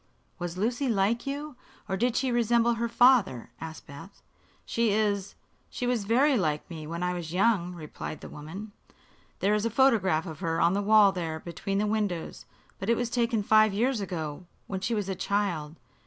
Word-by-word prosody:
"Was 175 0 -4
Lucy 245 +6 0
like 225 +4 +1
you, 290 +1 -4 0.3
or 190 - -1
did 240 +4 0
she 260 -1 +1
resemble 235 0 +3
her 235 0 -2
father?" 235 - +4
asked 160 -1 -8
Beth. 155 +8 -12 0.4
"She 230 -1 +1
is 205 -2 0 0.3
she 250 - -4
was 245 -4 0
very 265 +7 +4
like 155 -6 -1
me 155 -2 -7
when 170 +2 -4
I 180 0 0
was 170 -3 -5
young," 185 -3 +2
replied 155 -1 -7
the - - -8
woman. 185 +9 -8 0.7
"There 200 +2 +3
is 210 0 +1
a 230 - +1
photograph 210 -10 +3
of 160 -4 -8
her 165 0 -1
on 170 +2 +4
the 200 - 0
wall 210 -1 +6
there 165 -4 -4
between 185 +4 -4
the 210 - +1
windows; 205 -6 -2 0.3
but 195 - -4
it 235 - +3
was 240 -1 -2
taken 235 -3 +1
five 215 -1 +4
years 240 +1 +1
ago, 170 -3 -5 0.2
when 190 - -4
she 225 +4 -1
was 205 -3 -2
a 195 - -1
child. 180 -6 -2
200 Hz, 190 wpm, -28 LUFS, 175-230 Hz, 0.7 s, wall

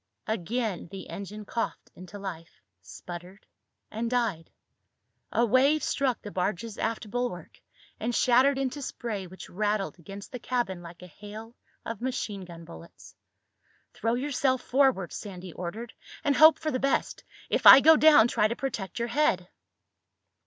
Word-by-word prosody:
Again 220 -1 -2
the 195 -1 -9
engine 210 +2 -7
coughed 230 +3 -4
into 185 +3 -11
life, 175 -4 -8 0.2
sputtered, 175 - -10 0.5
and 230 +2 -3
died. 230 -10 -1 0.8
A 235 - +2
wave 275 +6 +3
struck 265 -4 -1
the 205 - -7
barge's 200 +4 -3
aft 225 -1 -2
bulwark, 245 -9 -4 0.4
and 235 +1 -2
shattered 260 +3 +4
into 270 +1 -2
spray 215 -7 -5
which 185 +2 -11
rattled 205 -1 -2
against 195 +4 -10
the 250 - -6
cabin 235 -7 -2
like 170 +1 -12
a 180 -4 -15
hail 220 +3 -9 0.3
of 230 -2 -5
machine 215 -6 -3
gun 170 -1 -11
bullets. 170 0 -13 0.8
"Throw 230 +1 -1
yourself 260 -1 0
forward," 260 -9 +2
Sandy 185 -4 -8
ordered, 215 +7 -6 0.3
"and 285 - +2
hope 315 0 +8
for 310 -1 -3
the 255 - -1
best. 275 +1 -1 0.3
If - - +3
I 265 - +12
go 320 +3 +7
down 300 -7 +7
try 210 -3 +2
to 235 - -3
protect 230 -8 -4
your 235 0 -2
head." 215 -10 +1
220 Hz, 150 wpm, -28 LUFS, 185-250 Hz, 0.8 s, I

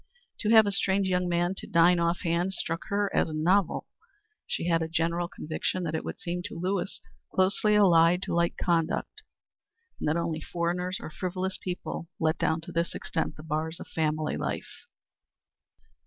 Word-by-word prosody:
To 215 - 0
have 220 -1 +8
a 200 - 0
strange 195 0 +2
young 180 -1 +1
man 175 +1 +1
to - - -7
dine 175 -2 +5
off 170 +1 +1
hand 175 +1 0
struck 165 -1 -3
her 200 -1 0
as 155 - +1
novel. 180 +4 +2 0.6
She - - -2
had 165 -1 +3
a 160 - -1
general 170 +1 0
conviction 170 +3 -3
that 160 -2 -2
it 160 - -2
would - - -6
seem 175 -1 -3
to 185 -5 -6
Lewis 190 +2 -2 0.3
closely 200 +3 +3
allied 180 -3 +5
to - - -3
light 170 0 +2
conduct, 165 -2 0 0.8
and - - -2
that 155 - +1
only 165 -1 -2
foreigners 180 +2 -2
or - - -7
frivolous 185 +3 -3
people 175 -2 -5
let 160 0 +1
down 160 +1 +1
to - - -9
this 170 +1 -1
extent 160 - -2
the 155 - -11
bars 160 +1 -2
of - - -7
family 155 -1 -1
life. - - -5
170 Hz, 175 wpm, -28 LUFS, 165-185 Hz, 0.8 s, have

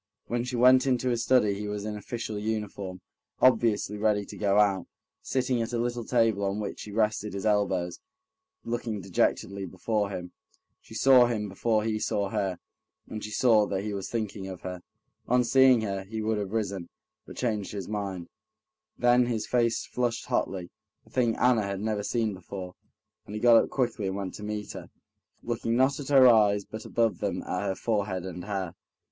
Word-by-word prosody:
When 120 0 -1
she 125 0 -4
went 130 +2 +6
into 125 -1 +1
his 120 -2 0
study 115 -6 +4
he 105 +1 -5
was 105 0 -4
in 105 -1 -3
official 110 0 -5
uniform, 105 -3 -4 0.4
obviously 110 -4 +3
ready 105 -1 +1
to - - -10
go 100 -1 +1
out, 100 -4 +2 0.3
sitting 125 -2 0
at 115 +1 -4
a - - +1
little 120 0 -2
table 115 -4 +2
on 100 +1 -1
which 105 - -5
he 105 - -8
rested 105 -1 0
his 100 - -4
elbows, 95 -4 +1 0.6
looking 115 -2 -3
dejectedly 95 +1 0
before 100 +3 -1
him. 90 -2 -6 0.5
She 110 - -14
saw 130 0 +6
him 110 -3 -2
before 110 +2 0
he 110 -1 -1
saw 100 -2 -1
her, 95 -4 -1 0.5
and 110 -1 -6
she 105 - -5
saw 110 -1 +4
that 95 0 -2
he 105 -1 -3
was 100 -1 -4
thinking 105 -4 -3
of 95 -2 -8
her. 90 -1 -6 0.5
On 125 +1 +3
seeing 130 0 +5
her, 100 -3 -3
he 110 +3 -6
would 110 0 0
have 100 -2 -3
risen, 100 -5 -2 0.4
but - - -11
changed 105 -6 -2
his 100 -3 -5
mind, 100 -5 -4 0.7
then 120 0 +4
his 115 -3 -1
face 115 -2 +1
flushed 120 -2 -2
hotly—a 90 -2 -4
thing 120 -3 +1
Anna 125 -3 +3
had 100 -1 -3
never 105 0 -1
seen 110 0 -1
before, 95 0 -8 0.5
and 105 - -7
he - - -3
got 120 0 +6
up - - -6
quickly 120 -6 -1
and 95 - -2
went 100 -2 -4
to 105 - -9
meet 105 0 -4
her, - - -9 0.5
looking 115 0 -1
not 130 +3 +3
at 140 - -6
her 135 -3 +7
eyes, 105 -4 +4
but 110 0 -8
above 115 -2 +1
them - - -2
at - - -2
her 95 - -1
forehead 100 -5 -1
and 90 -1 -6
hair. 95 -4 -3
105 Hz, 190 wpm, -28 LUFS, 100-120 Hz, 0.7 s, her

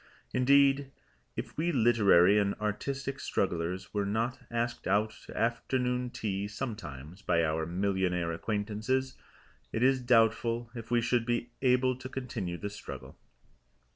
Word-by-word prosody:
Indeed, 140 +1 +4 0.5
if - - -5
we 170 +3 +1
literary 105 - +5
and 100 -1 +1
artistic 135 +6 -3
strugglers 90 -3 -2
were 105 -1 +1
not 115 +6 -1
asked 120 0 -2
out 105 +3 +2 0.2
to - - -9
afternoon 125 +2 0
tea 100 -4 -3
sometimes 100 - -6
by 85 -4 +2
our 80 0 0
millionaire 90 -2 0
acquaintances, 110 +8 -1 0.6
it 110 - 0
is 130 0 +4
doubtful 115 0 +2
if 115 -2 -8
we 120 -1 +3
should 120 0 +1
be 120 0 -1
able 130 0 +3
to 130 0 -8
continue 110 -10 -4
the 105 +3 -5
struggle. 105 - -9
115 Hz, 135 wpm, -30 LUFS, 100-125 Hz, 0.6 s, literary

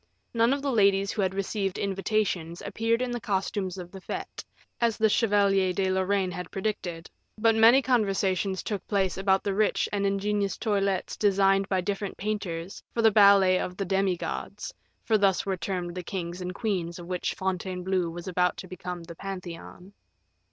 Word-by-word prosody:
None 230 +1 +3
of 280 0 -1
the 280 - 0
ladies 200 -3 +3
who 210 - -2
had 190 0 0
received 195 -1 -2
invitations 195 -4 -1
appeared 230 +2 0
in 250 - -2
the 240 - -2
costumes 195 -1 -2
of 175 -1 -8
the 190 - -10
fete, - - -6 0.4
as 230 -3 +1
the 220 - +4
Chevalier 200 -4 +3
de 190 0 0
Lorraine 190 0 +1
had 180 -1 -6
predicted, 185 -5 -4 0.3
but 225 +1 +4
many 230 +5 +6
conversations 195 -5 +1
took 205 -3 -4
place 195 -3 +1
about 190 0 +2
the 200 - -1
rich 210 +1 +1
and 200 -1 0
ingenious 200 0 0
toilettes 200 -4 0
designed 195 -1 +3
by 190 -2 +1
different 200 +1 -3
painters 195 -4 -4
for 230 - -1
the 220 - +6
ballet 200 -3 +6
of 180 0 -4
"The 195 - -2
Demi 190 -1 +1
Gods," - - -5 0.3
for 220 -2 +2
thus 195 -2 +2
were 195 -1 0
termed 175 0 -3
the 180 - -4
kings 175 0 -5
and 180 0 -5
queens 180 -6 -2
of 175 - -9
which 180 0 -2
Fontainebleau 185 -1 -1
was 170 +2 -8
about 180 -1 +1
to 185 - -8
become 180 -1 -6
the 170 0 -9
Pantheon. 180 0 -8
195 Hz, 180 wpm, -27 LUFS, 180-205 Hz, 0.4 s, many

